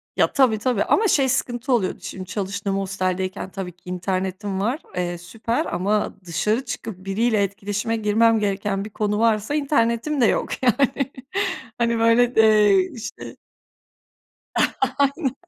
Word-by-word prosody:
Ya, - - +2
tabii, 255 -6 +4
tabii, 245 -3 +1
ama, 440 0 +3
şey, 275 -7 +3
sıkıntı 250 0 -1
oluyordu, 190 -6 +1
şimdi 185 - -7
çalıştığım 195 0 -3
hosteldeyken 190 -1 -2
tabii 185 -2 -5
ki 180 +1 -14
internetim 190 +2 -2
var. 235 +9 0 0.2
Eee, 175 -1 -2
süper 225 - -3
ama 205 - -1
dışarı 215 - 0
çıkıp 195 -4 -6
biriyle 210 +1 +1
etkileşime 205 +3 -2
girmem 220 +1 +3
gereken 200 -1 -1
bir - - -7
konu 210 0 -1
varsa 225 +3 +2
internetim 275 -1 +1
de - - +6
yok, - - +1
yani. 245 -4 +4 0.2
yani. 275 -1 -2 0.7
Hani, 235 -1 +1
böyle, 235 +2 +4
eee, 210 -4 +5
işte. 230 -3 -8 1.6
Aynen. 280 -1 +1
215 Hz, 140 wpm, -22 LUFS, 195-235 Hz, 1.6 s, de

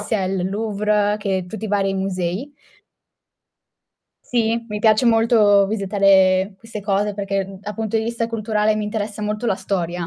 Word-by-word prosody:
sia 210 -2 -1
il 185 -1 -1
Louvre 210 0 0
che 195 -3 -2
tutti 220 +3 -6
i - - -6
vari 195 -1 +1
musei. 190 +5 -3 1.7
Sì, 230 -1 0
mi 210 -1 -4
piace 215 +2 +3
molto 225 -3 +4
visitare 195 -2 +3
queste 225 0 -8
cose, 205 +1 0
perché, 195 -1 -2
uhm, 195 -1 -10
a 210 0 -5
punto 220 0 -2
di 220 - +1
vista 230 0 -2
culturale 215 -1 0
mi 215 - -2
interessa 210 0 -4
molto 210 +3 -2
la 210 - +2
storia. 175 -3 -3
210 Hz, 160 wpm, -21 LUFS, 195-220 Hz, 1.7 s, molto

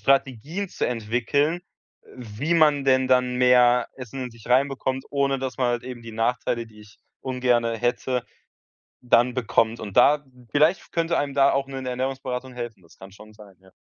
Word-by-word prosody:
Strategien 140 - 0
zu - - -2
entwickeln, 125 +8 0 0.4
äh, - - -18
wie 125 +7 -3
man 150 -4 +4
denn 130 0 +3
dann 125 -1 +2
mehr 125 -1 +4
Essen 130 +1 -7
in 125 - -7
sich 115 -1 -17
reinbekommt, 130 0 +1
ohne 140 -1 0
dass 130 -1 -5
man 125 - +2
halt 120 -1 -1
eben 125 -2 -7
die 115 -1 -10
Nachteile, 115 +1 -1
die 110 -1 -17
ich 105 0 -17 0.2
ungerne 125 -3 0
hätte, 125 +1 -1 0.8
dann 125 0 +3
bekommt 115 -2 +1
und 100 +1 -8
da 145 +4 +5 0.3
vielleicht 160 +5 +2
könnte 165 0 0
einem 140 -1 -2
da 140 0 +5
auch 135 0 0
‘ne 135 -1 -7
Ernährungsberatung 130 0 -4
helfen, 120 -6 -7
das 85 - -21
kann 95 +1 -12
schon 110 +1 -15
sein, 105 -3 -16
ja. 95 0 -21
125 Hz, 180 wpm, -24 LUFS, 115-135 Hz, 0.8 s, da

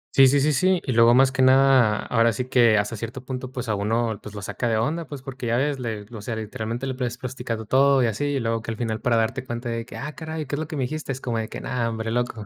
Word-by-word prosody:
Sí, 135 -1 +8
sí, 140 +2 +4
sí, 150 +2 +2
sí. 185 +5 +3
Y 130 - -1
luego 115 0 +6
más 135 +1 +5
que 130 - -1
nada, 130 -4 +5
ahora 115 -1 +2
sí 125 +2 -3
que 120 -4 +4
hasta 105 +2 -1
cierto 115 +4 -7
punto, 130 0 -5
pues 125 -2 -5
a 110 - 0
uno, 110 +2 -1
pues 105 0 -10
lo 100 - -6
saca 120 - -3
de 115 -1 +1
onda, 155 +8 -1
pues, 140 -2 -8
porque 130 -2 -6
ya 115 +1 +1
ves, 140 +1 0
le 110 -4 -4
o 110 -3 -8
sea, 110 +2 -4
literalmente 110 +3 -4
le 130 - -2
pues 125 -1 -3
platicado 120 -3 -5
todo 135 +3 +4
y - - +4
así, 115 +5 -1
y 145 -1 0
luego 115 -1 -1
que 115 - -8
al 115 - -4
final 110 -2 -2
para 120 -1 +2
darte 115 +4 0
cuenta 120 0 -5
de 115 0 -4
que: - - -9
"Ah 150 +2 -5
caray, 160 -1 -5
¿qué 135 - -9
es - - -4
lo 155 - -3
que 160 - -6
me 135 - -1
dijiste? 155 +2 -4
Es 130 - -4
como 120 -4 -2
de 110 - -4
que - - -7
no 120 -2 -1
hombre, 115 0 -3
loco, 120 -2 -2
125 Hz, 300 wpm, -24 LUFS, 115-135 Hz, -, Sí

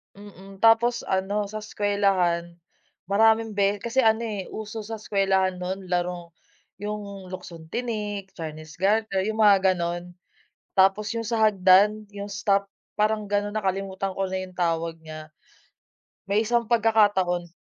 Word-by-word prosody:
Mm, 195 -1 -13
tapos 230 +1 +4
ano 200 +2 -1
sa 215 - -4
eskuwelahan, 195 -5 0 0.5
maraming 220 +2 +3
be 200 0 +1
kasi 235 +3 -1
ano, 225 -2 +3
eh, 210 -4 -4
uso 220 +1 -6
sa 225 +1 -5
eskuwelahan 190 -3 +1
noon 185 +1 -5
larong 175 -1 -2 0.5
'yung, 205 -2 -6
luksong-tinik, 200 +3 -5
chinese 155 -2 -8
garter, 195 0 +1
'yung 220 +1 -1
mga 195 -3 +5
ganon. 175 0 -4 0.6
Tapos 195 +3 +3
'yung 230 - -2
sa 225 -1 +2
hagdan, 205 +2 +4
'yung 200 0 -6
stop 200 0 +1 0.3
parang 215 -1 0
gano'n, 205 0 0
nakalimutan 195 -2 -2
ko 195 - 0
na 190 0 -3
'yung 185 -1 -10
tawag 165 -1 -1
niya. 155 -1 -10 1.0
May 205 +3 +2
isang 235 0 0
pagkakataon 205 -6 +2
200 Hz, 135 wpm, -25 LUFS, 185-215 Hz, 1.0 s, mga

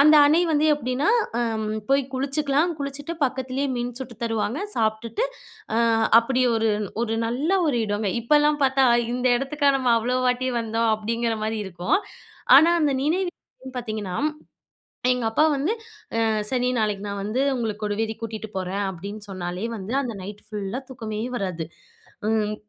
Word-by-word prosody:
அந்த 305 +2 +8
அணை 310 +4 +4
வந்து 300 0 +3
எப்படீன்னா, 260 +1 -1 0.3
அ - - +1 0.5
போய் 275 +1 +4
குளிச்சுக்கலாம். 285 +4 +1
குளிச்சுட்டு, 285 +3 -4
பக்கத்திலேயே 260 +1 -1
மீன் 240 0 -3
சுட்டு 245 -3 -7
தருவாங்க. 225 +3 -1 0.2
சாப்ட்டுட்டு 220 - 0 0.5
அ - - +3 0.4
அப்படி 255 +2 0
ஒரு 225 0 +2 0.3
ஒரு 225 -1 -1
நல்ல 260 +8 -1 0.2
ஒரு 255 -5 +1
இடமே. 205 -1 -1
இப்பல்லாம் 295 +4 +3
பார்த்தா, 265 0 +3 0.3
"இந்த 250 +1 -1
இடத்துக்கா 280 +2 +1
நம்ம 255 -2 +1
அவ்வளோ 250 +3 0
வாட்டி 250 +1 +1
வந்தோம்." 225 0 0
அப்படீங்கிற 230 +1 -1
மாரி 220 0 -1
இருக்கும். 180 - 0 0.6
ஆனா 320 +5 +7
அந்த 290 -2 +2
நினைவுன்னு 320 -5 -3
பார்த்தீங்கன்னா, 215 -6 -4 1.0
எங்க 250 -2 -2
அப்பா 300 +7 +4
வந்து 285 +8 0 0.5
"அ - - +2 0.2
சரி 250 -1 +1
நாளைக்கு 210 -2 0
நான் 200 0 -4
வந்து, 215 +5 -1 0.2
உங்கள 230 -3 -1
கொடுவேரி 215 +1 -1
கூட்டிட்டு 220 -1 -5
போறேன்" 190 +2 -2
அப்படீன்னு 200 +4 -7
சொன்னாலே 180 +1 -4
வந்து, 200 +2 -6
அந்த 245 -3 -3
நைட்டு 205 +2 -9
ஃபுல்லா 210 +1 -4
தூக்கமே 220 -5 -5 0.2
வராது. 185 -6 -3 0.6
ம். 215 -1 +1
235 Hz, 150 wpm, -24 LUFS, 215-275 Hz, 1.0 s, அந்த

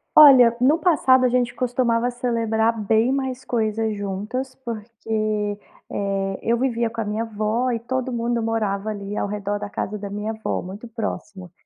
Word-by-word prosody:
Olha, 260 -6 +9
no 285 +6 +5
passado, 265 -8 +4
a - - +4
gente 245 -1 0
costumava 245 -1 +1
celebrar 230 -2 0
bem 220 +4 +2
mais 265 -1 -2
coisas 220 -2 -1
juntas 210 +7 -4
porque, 215 -2 -2 0.3
eh, 195 -1 -2
eu 230 +1 +2
vivia 235 -2 +1
com 225 0 -4
a - - -2
minha 210 +2 -2
avó 225 +3 -1
e 230 - -1
todo 260 +2 -3
mundo 235 0 0
morava 215 -2 -1
ali, 205 0 -5
ao - - 0
redor 205 0 -2
da 205 0 -6
casa 210 +2 -3
da 200 -1 -7
minha 210 +1 -3
avó, 220 0 -3
muito 195 +6 -8
próximo. 210 -5 -6
225 Hz, 170 wpm, -23 LUFS, 210-245 Hz, 0.3 s, Olha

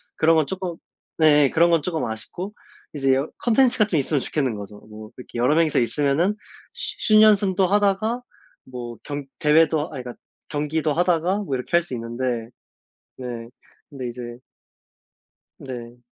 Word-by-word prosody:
그런 165 +1 +4
건 155 -2 +3
쪼끔 185 -2 -4 0.4
네 150 -2 +5
예 - - +2
그런 170 +1 +4
건 165 -3 +2
조금 165 -3 -2
아쉽고 175 - -6 0.4
이제 135 -2 +2
여 135 +4 0
콘텐츠가 240 -2 +4
좀 170 -8 0
있으면 140 +2 0
좋겠는 130 -4 -1
거죠. 105 0 -9
뭐 110 +1 -11
이렇게 125 - -9
여러 125 +6 +3
명이서 165 -2 +3
있으면은 145 - +1 0.4
쉬 215 - -1
슛 215 - +8
연습도 200 -3 +4
하다가 205 +4 +1 0.4
뭐 120 -2 -8
경 145 -1 -5
대회도 155 +1 +4
아 155 - -4
그러니까 125 -4 -7 0.3
경기도 150 +1 -1
하다가 175 +3 +1
뭐 160 -10 -3
이렇게 125 - -6
할 - - +3
수 165 - -9
있는데 120 0 -3 0.7
네. 120 -2 -6 0.4
근데 135 -4 -6
이제 120 0 -7 1.2
네. 120 -2 -9
150 Hz, 310 characters per minute, -23 LUFS, 125-175 Hz, 1.2 s, 슛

